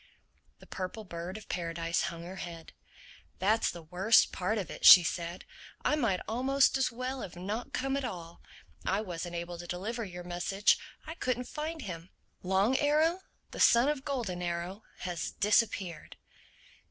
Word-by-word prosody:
The - - -16
Purple 190 +4 -5
Bird 175 +1 -6
of 215 - -12
Paradise 165 -1 -1
hung 170 0 -5
her 185 +2 -8
head. 170 -3 -8 0.6
"That's 215 +4 +2
the 170 - -7
worst 185 +7 +4
part 190 +5 -1
of 195 - -3
it," - - -9
she 180 - +11
said. 170 +2 -4 0.4
"I 300 - +3
might 225 -11 +1
almost 265 +4 +3
as 265 -1 +1
well 255 +2 -4
have 175 - -7
not 205 +7 -4
come 270 +1 -1
at 275 - -1
all. 170 -8 -6 0.4
I 195 +3 0
wasn't 175 -3 -5
able 170 0 -5
to 175 - -8
deliver 215 +7 -3
your 180 -3 -7
message. 180 +3 +1 0.3
I 320 - -6
couldn't 255 -6 -1
find 310 0 -4
him. 170 -2 -7 0.3
_Long 195 +7 +2
Arrow, 310 +4 +3 0.3
the - - -8
son 240 +4 +6
of 295 -3 -2
Golden 235 -11 -3
Arrow, 175 +3 -3 0.2
has 175 -2 -3
disappeared! 200 -5 0
190 Hz, 165 wpm, -31 LUFS, 175-245 Hz, 0.6 s, she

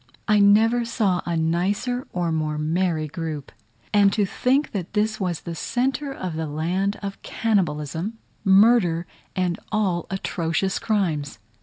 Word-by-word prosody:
I 210 -1 +4
never 220 +4 +5
saw 215 -6 0
a 170 -1 0
nicer 195 +10 0
or 175 -2 -1
more 155 -1 -1
merry 160 0 0
group; 155 -3 -5 0.4
and 200 -1 +5
to 210 - +2
think 265 +9 +1
that 190 -2 -4
this 215 +1 0
was 180 -5 -2
in 170 - -4
the - - -5
centre 260 - -1
of 185 -10 -5
the 160 0 -2
land 180 +7 -1
of 195 0 -5
cannibalism, 175 -1 -1 0.3
murder, 195 -4 +5 0.3
and 180 -2 0
all 190 -6 0
atrocious 190 -1 -1
crimes! 180 -11 -1
190 Hz, 145 wpm, -24 LUFS, 165-215 Hz, 0.4 s, never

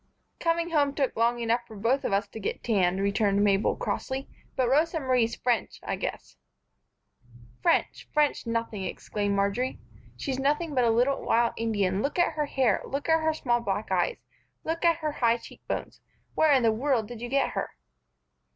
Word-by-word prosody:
"Coming 335 0 0
home 285 -3 +2
took 270 -4 0
long 235 +2 +2
enough 235 +1 +1
for 220 - -11
us 270 +3 +3
both 200 +1 -1
to 220 - -7
get 200 - -4
tanned," 190 -5 +2
returned 200 0 +2
Mabel, 200 0 +2
crossly, 265 0 -3 0.3
"but 255 -2 +1
Rosa 320 +6 +2
Marie's 255 -4 +1
French, 240 -4 -1
I - - -2
guess." - - -6 1.2
"French! - - +1
French 295 -5 +1
nothing!" 230 -3 -2
exclaimed 205 +1 -2
Marjory. 200 +6 0 0.4
"She's 265 -2 -3
nothing 295 +3 0
but 250 -3 +3
a - - +4
little 245 +5 +2
wild 235 0 +2
Indian. 205 -4 0
Look 285 +7 -2
at 350 -2 +3
her 300 -1 -1
hair. 255 -7 +2
Look 280 +3 -4
at 320 0 +4
her 315 0 +1
small 240 -5 +1
black 205 -2 -3
eyes. 485 - +1 0.5
Look 330 +2 -3
at 335 -1 +5
her 305 - +1
high 235 -4 +2
cheekbones. - - -7 0.3
Where 315 -1 +4
in 265 -3 +4
the 225 - +4
world 235 -1 0
did 235 -1 -9
you 240 - -4
get 275 +1 +1
her?" - - -3
240 Hz, 180 wpm, -27 LUFS, 220-285 Hz, 1.2 s, at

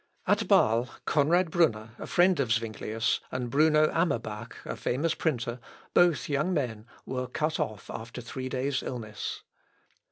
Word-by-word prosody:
At - - +3
Bâle 115 +3 +3 0.2
Conrad 165 +3 +3
Brunner, 115 -11 +2
a - - -6
friend 180 -2 +4
of 130 -4 +1
Zuinglius, 110 0 0
and 125 -2 -3
Bruno 155 +1 +5
Amerbach, 120 -9 -1
a - - -4
famous 150 +6 0
printer, 120 -7 -1 0.3
both 175 -6 +4
young 150 +5 0
men, 115 -6 -2 0.2
were 125 -1 -3
cut 155 +5 -1
off 110 -2 -3
after 115 +2 -7
three 130 +2 -5
days' 130 +1 -1
illness. 110 -4 -5
130 Hz, 140 wpm, -28 LUFS, 115-155 Hz, 0.3 s, Bruno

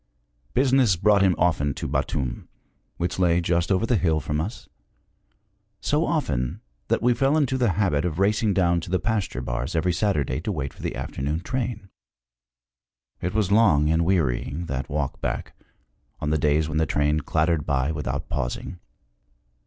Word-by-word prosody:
Business 130 -5 +4
brought 100 +3 +3
him 95 -2 +4
often 75 -4 +1
to - - -4
Batum, 65 -4 -2 0.5
which 90 +2 -2
lay 85 -2 +3
just 85 +1 0
over 95 +4 +2
the 120 0 +2
hill 80 -4 +2
from 75 +1 -2
us 105 +9 -6 1.1
so 150 - +1
often 65 - -1 0.3
that - - 0
we 125 0 +4
fell 135 +5 +2
into 135 -4 +1
the 120 -7 +2
habit 85 -8 +1
of 80 -3 -2
racing 105 +2 +2
down 85 -2 +3
to - - -8
the 95 - +2
pasture 105 - -2
bars 60 +5 -3
every 90 +2 +1
Saturday 75 -9 0
to 105 - -2
wait 70 -7 -3
for - - -14
the - - -3
afternoon 75 +4 -3
train. 120 -2 -3 1.3
It 90 +3 -3
was 105 -3 +1
long 85 -9 +4
and 80 +1 +2
wearying, 80 -2 0
that 70 -4 -4
walk 75 -2 -3
back, - - -3 0.7
on 75 - -2
the 80 - +1
days 75 +1 +2
when 80 0 -1
the 80 - +1
train 75 +2 +1
clattered 80 +1 0
by 70 0 +1
without 70 -2 -3
pausing. 70 +7 -4
85 Hz, 170 wpm, -24 LUFS, 75-100 Hz, 1.3 s, Business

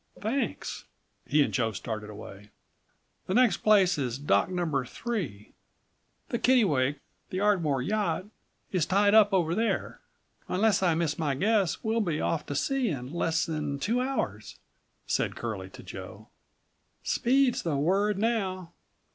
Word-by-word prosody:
"Thanks." 235 +7 -3 0.4
He 150 -1 +4
and - - -3
Joe 115 -3 0
started 105 +1 -5
away. 105 -1 -10 0.8
"Next 240 +3 +4
place 195 -6 +4
is 125 -3 -2
Dock 145 +4 +2
No. 170 -7 -1
3. 160 - -5 0.8
The 235 - -1
Kittlewake, 150 - +3 0.3
the 185 - -3
Ardmore 170 -11 +2
yacht, 205 -1 -1 0.5
is 180 -5 +1
tied 205 +2 +3
up 215 -1 +6
over 170 -4 +2
there. 225 +4 -1 0.5
Unless 205 +2 +2
I 175 -4 +3
miss 160 -2 -1
my 145 -4 0
guess 200 +3 +1
we'll 225 0 +1
be 165 -7 -1
off 160 - -1
to 145 - -4
sea 260 - 0
in 130 -3 -5
less 165 -1 0
than 150 -3 -3
two 230 - 0
hours," 270 +1 -3 0.5
said - - -1
Curlie - - -5
to - - -12
Joe. - - -10 0.7
"Speed's 260 +1 +2
the 160 -4 -1
word 195 +7 +1
now. 190 -6 -1
180 Hz, 140 wpm, -28 LUFS, 145-215 Hz, 0.8 s, up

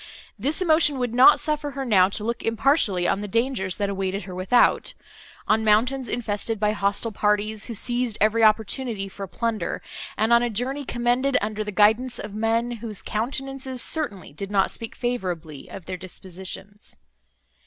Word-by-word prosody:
This 290 - 0
emotion 315 -4 +4
would 245 -2 -2
not 255 +11 +7
suffer 300 -1 -1
her 270 - -2
now 190 -6 +4
to 205 - -4
look 235 +2 -2
impartially 225 - +2
on 200 - 0
the 210 - -4
dangers 230 -4 -1
that 205 - 0
awaited 195 0 -2
her 185 - -8
without; 185 +7 +2 0.5
on 220 +1 +3
mountains 245 +5 +2
infested 220 -1 -2
by 210 0 +2
hostile 200 +2 -1
parties, 210 +1 0
who 235 - -6
seized 240 0 -1
every 220 +2 +3
opportunity 220 0 +1
for 195 0 -8
plunder; 220 -2 -2 0.4
and 220 +2 +2
on 235 - +6
a 240 - 0
journey 260 +6 -2
commenced 245 +3 +1
under 215 +1 -3
the 210 - -5
guidance 220 +5 +3
of 210 -1 -7
men, 225 +2 0
whose 215 -3 -6
countenances 265 +3 -3
certainly 205 - 0
did 195 +6 -6
not 195 -2 +2
speak 230 -1 -5
favourably 175 - -4
of 180 - -9
their 185 0 -5
dispositions. 190 +2 -8
220 Hz, 165 wpm, -24 LUFS, 200-245 Hz, 0.5 s, not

